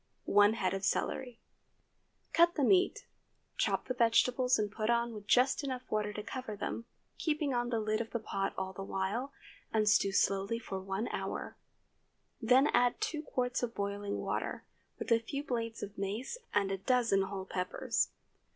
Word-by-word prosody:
1 205 +1 +5
head 190 -4 0
of 195 0 -3
celery. 245 +3 -1 0.9
Cut 340 +1 +6
up 345 - -23
the 290 - +1
meat; 370 +7 +3 0.5
chop - - 0
the 255 - 0
vegetables, 250 +2 +3
and 210 -1 -1
put 215 +1 -2
on 235 0 +2
with 210 -1 -9
just 260 +3 +4
enough 260 -2 -3
water 210 -1 0
to 210 0 -6
cover 230 -1 -5
them, 230 +3 -4 0.3
keeping 300 -3 0
on 240 0 0
the 230 -2 0
lid 215 0 0
of 225 - -5
the - - -1
pot 195 -3 -2
all 190 0 -3
the 195 - -7
while, 195 +8 -2 0.4
and 215 -1 +2
stew 200 -1 +4
slowly 195 +3 +1
for 195 -4 -5
one 195 +4 -3
hour. - - -4 0.9
Then 255 +4 +5
add 245 0 +3
two 305 -2 -2
quarts 250 -3 -1
of 235 -1 -3
boiling 200 0 -2
water, - - -3 0.3
with - - -5
a 230 - +6
few 275 +5 -4
blades 230 -4 -3
of 205 0 -7
mace 215 - -3
and 200 -1 +1
a 195 - -2
dozen 230 -2 +3
whole 190 0 -3
peppers. 180 -1 -1
225 Hz, 180 wpm, -33 LUFS, 200-250 Hz, 0.9 s, Cut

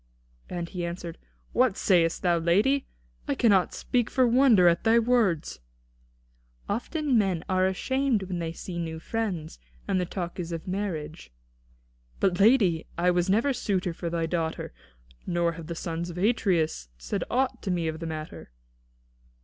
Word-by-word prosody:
And 175 -1 -4
he 180 -1 -5
answered: 170 -1 -5 0.3
"What 245 -5 +3
sayest 170 -4 +2
thou, 175 -2 +3
lady? 205 +12 +2 0.4
I - - 0
cannot 200 -6 +3
speak 245 -3 -1
for 255 - +3
wonder 235 -7 +5
at 170 0 +3
thy 225 +1 +5
words." 225 - +1 1.1
"Often 260 +4 0
men 185 -5 0
are 185 0 +2
ashamed 260 +3 0
when 180 -2 -4
they 165 -1 -3
see 170 +1 -6
new 160 -1 -4
friends, 180 - -3 0.3
and 185 - +1
the 180 - -2
talk 175 -1 -5
is 170 -1 -4
of 165 +1 -5
marriage." 175 - -4 0.9
"But 180 -2 +1
lady, 200 -7 +4
I 180 +1 +3
never 190 +9 +2
was 260 - -1
suitor 185 -4 -1
for 170 +1 -4
thy 165 -1 -1
daughter. 160 - -3 0.5
Nor 170 -1 +1
have 165 -1 -9
the 170 - -4
sons 170 +1 -4
of 175 - -8
Atreus 180 - +1
said - - -3
aught 260 +1 0
to 195 - -4
me 175 -3 0
of 160 0 -3
the 165 - -5
matter." 155 - -7
180 Hz, 160 wpm, -27 LUFS, 165-215 Hz, 1.1 s, wonder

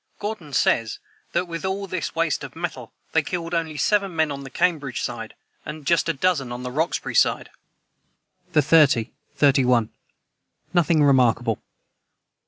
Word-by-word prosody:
Gordon 205 -8 -5
says 115 -4 +1 0.4
that, 180 - 0
with 165 -1 -6
all 190 +1 -2
this 185 -3 -4
waste 165 -1 0
of - - -9
metal, - - -5 0.2
they - - +3
"killed 170 -1 -4
only 160 -3 -1
seven 195 0 +1
men 160 -2 +1
on 140 0 -6
the 135 - -8
Cambridge 150 -5 0
side, - - -5 0.3
and 150 -1 -8
just 170 +2 +2
a - - +2
dozen 140 -4 0
on 120 +1 -6
the 125 - -4
Roxbury 160 +6 -1
side."] - - +2 1.0
the 150 - +4
30, 135 -6 +4 0.3
31. 125 -5 +3 0.8
Nothing 170 -3 +3
remarkable. 120 -5 +3
155 Hz, 150 wpm, -23 LUFS, 135-170 Hz, 1.0 s, the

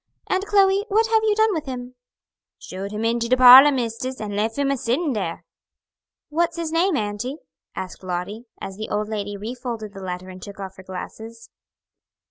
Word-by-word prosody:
Aunt 380 +2 0
Chloe, 395 -1 +4
what 440 +2 +3
have 445 -1 +4
you 430 -1 +2
done 440 -1 +3
with 315 -4 -4
him?" 250 -1 -6 0.6
"Showed 195 +2 -7
him 215 +1 -3
into 235 0 0
de 255 - +4
parlor, 255 +3 +10
mistis, 255 0 -3
and 205 -1 -4
leff 220 +2 -1
him 280 -1 +1
a 275 - 0
sittin' 260 +6 0
dar." 185 -6 -3 0.9
"What's 335 +2 0
his 330 -2 -3
name, 335 0 +2
auntie?" 215 +6 -3 0.4
asked 185 -1 -6
Lottie, 185 +5 -4
as 195 0 -7
the 215 - -5
old 210 0 -2
lady 205 -2 -4
refolded 225 -1 -6
the 195 - -9
letter 185 0 -5
and 185 0 -10
took 200 +1 -10
off 190 -1 -7
her 190 - -11
glasses. 220 +5 -9
230 Hz, 185 wpm, -23 LUFS, 205-295 Hz, 0.9 s, parlor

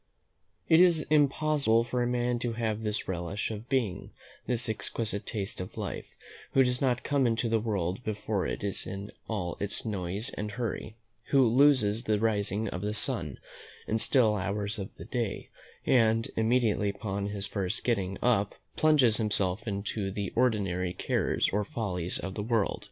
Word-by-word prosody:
It 160 - +6
is 175 -4 +5
impossible 145 -5 +3
for 120 +1 -2
a 120 - +1
man 120 0 0
to 120 -1 -2
have 110 -1 -2
this 105 -1 -2
relish 95 +4 -3
of 110 +3 -7
being, 115 -9 -1 0.4
this 120 -1 0
exquisite 110 -1 -2
taste 100 -4 -4
of 90 - -8
life, - - -5 0.4
who 135 - +6
does 125 0 0
not 125 -3 +1
come 140 -3 +2
into 115 +1 +1
the 115 0 +2
world 100 -1 -2
before 105 -2 -2
it - - -4
is 100 -2 -3
in 100 +1 -6 0.2
all 90 -6 -2
its 100 +3 -2
noise 100 +3 -2
and 105 0 -5
hurry; 110 -1 -4 0.3
who 135 -1 +4
loses 120 -3 +4
the 105 -1 +2
rising 105 -1 0
of 90 - -4
the 105 +1 -2
sun, - - +1 0.5
the 110 - 0
still 110 -4 +4
hours 100 +1 -2
of 100 +2 -6
the - - -10
day, 115 -5 -3 0.4
and, 115 -2 +3
immediately 110 -2 +2
upon 100 0 -3
his 100 -1 -4
first 100 -2 -3
getting 95 -5 0
up 110 -5 +2 0.2
plunges 140 -8 +4
himself 105 -2 +1
into 100 0 -2
the 100 -1 -4
ordinary 95 -7 +1
cares - - +1
or 105 +1 +2
follies 90 -5 -2
of 95 +1 -5
the 105 - -4
world. 110 -1 0
110 Hz, 170 wpm, -29 LUFS, 100-120 Hz, 0.5 s, It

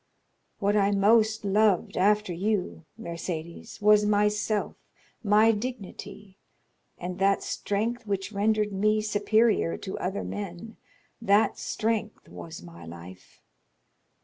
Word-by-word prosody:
What 205 0 +1
I 200 -1 +3
most 215 +2 +3
loved 205 -1 +2
after 210 0 +2
you, 185 -3 -2
Mercédès, 170 -3 -6
was 210 0 +6
myself, 210 0 +1 0.5
my 215 +2 +5
dignity, 205 -3 -7 0.6
and 180 +1 -6
that 195 0 +2
strength 225 +3 -2
which 195 0 -2
rendered 210 0 +1
me 215 +2 +2
superior 215 -2 +2
to 190 - -6
other 190 +2 -3
men; 205 +2 -7 0.4
that 210 -1 +3
strength 220 -1 -2
was 165 0 -9
my 85 -1 -12
life. 85 +3 -12
205 Hz, 110 wpm, -27 LUFS, 190-215 Hz, 0.6 s, was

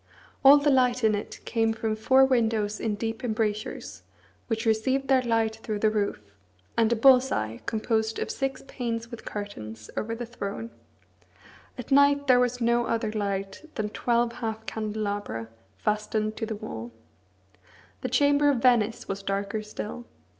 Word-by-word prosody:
All 275 +2 +10
the 290 0 +2
light 250 -2 +3
in 220 -1 +4
it 205 - -4
came 225 -1 +1
from 220 -1 -2
four 260 +5 +5
windows 225 -5 +1
in 220 -2 -1
deep 225 +4 -4
embrasures, 215 -1 -2 0.5
which 225 0 -2
received 260 +5 +1
their 265 -1 +5
light 225 -2 0
through 220 -1 -4
the 215 +1 +2
roof, 200 - -2 0.4
and 230 0 +3
a - - +4
bull's 260 +2 +6
eye, 110 +1 -2
composed 220 0 0
of - - -2
six 270 -1 -3
panes 230 -2 -4
with 235 - -9
curtains, 110 - -7
over 230 +1 -2
the 240 +1 -5
throne. 225 -1 -6 1.1
At 250 - -8
night 285 +1 +5
there 255 -2 +5
was 250 0 +1
no 235 0 +2
other 225 -2 -1
light 200 0 -3
than 210 -1 -2
twelve 235 +2 +1
half 220 -2 -4
candelabra, 205 - -3 0.3
fastened 215 - -1
to 225 - -3
the 220 - -3
wall. 120 - -7 1.1
The 255 - -2
chamber 285 0 +4
of 280 - +2
Venice 235 -2 +2
was 195 0 -4
darker 200 +2 -2
still. 215 +3 -7
225 Hz, 160 wpm, -27 LUFS, 210-245 Hz, 1.1 s, All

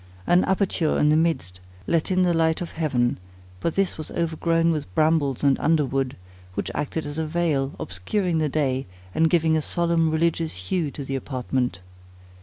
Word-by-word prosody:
An 175 - +4
aperture 190 -4 +1
in 150 - +3
the 155 - +4
midst 155 - 0 0.3
let 165 - +1
in 185 -1 +3
the 175 -1 +3
light 160 -1 +2
of 175 - -5
heaven; 130 - 0 0.4
but 165 - -1
this 195 -4 0
was 155 - -5
overgrown 165 0 +1
with 150 - -3
brambles 155 -4 +2
and 140 -1 +3
underwood, 135 -4 +1 0.4
which 100 - -2
acted 150 +2 -3
as 145 +2 -4
a 160 - -1
veil, 150 -4 0
obscuring 165 - -1
the 155 -1 +1
day, 135 -3 0 0.3
and 160 0 +3
giving 160 -1 +3
a 155 - +2
solemn 170 0 +1
religious 160 - -1
hue 175 -5 +1
to 140 0 -7
the 135 - -3
apartment. 130 -6 -2
155 Hz, 175 wpm, -24 LUFS, 135-165 Hz, 0.4 s, An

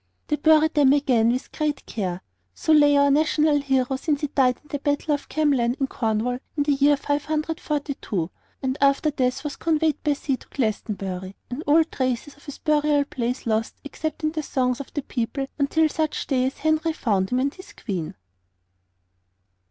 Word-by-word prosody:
They 300 - +2
bury 315 +1 +5
them 285 -3 +4
again 250 -6 +3
with 250 +2 -3
great 300 -2 -2
care. 185 -4 -4 0.3
So 315 - +2
lay 290 -1 +6
our 280 0 +4
national 300 0 +3
hero 265 -1 0
since 290 +1 -1
he 295 - 0
died 255 -3 +2
at 300 - -25
the 285 - -2
Battle 290 +1 0
of 285 - -4
Camlan 270 -6 +1
in 270 - +2
Cornwall 230 0 -1 0.2
in 290 - +3
the 290 - +1
year 285 +1 +4
542, 290 - -2 0.3
and 260 +1 -1
after 280 +2 +3
death 255 -3 -1
was 295 -2 -5
conveyed 320 -1 +1
by 295 - +2
sea 275 -1 -2
to - - -18
Glastonbury, 195 -5 -3 0.2
and 250 +5 -4
all 315 +3 +6
traces 260 -2 -3
of 285 - -21
his 285 - -8
burial 295 -2 +2
place 250 -2 -3
lost 225 -1 0
except 315 +2 -5
in 310 - +1
the 315 -1 -2
songs 255 -3 0
of 280 - -8
the 290 - -2
people 255 +3 -2
until 310 +3 +3
such 310 0 -2
day 260 -2 +1
as 265 - -5
Henry 315 +1 +1
found 195 -10 0
him 250 - +1
and 275 +2 0
his 370 - -13
Queen. 180 -8 -5
280 Hz, 185 wpm, -24 LUFS, 250-300 Hz, 0.3 s, lay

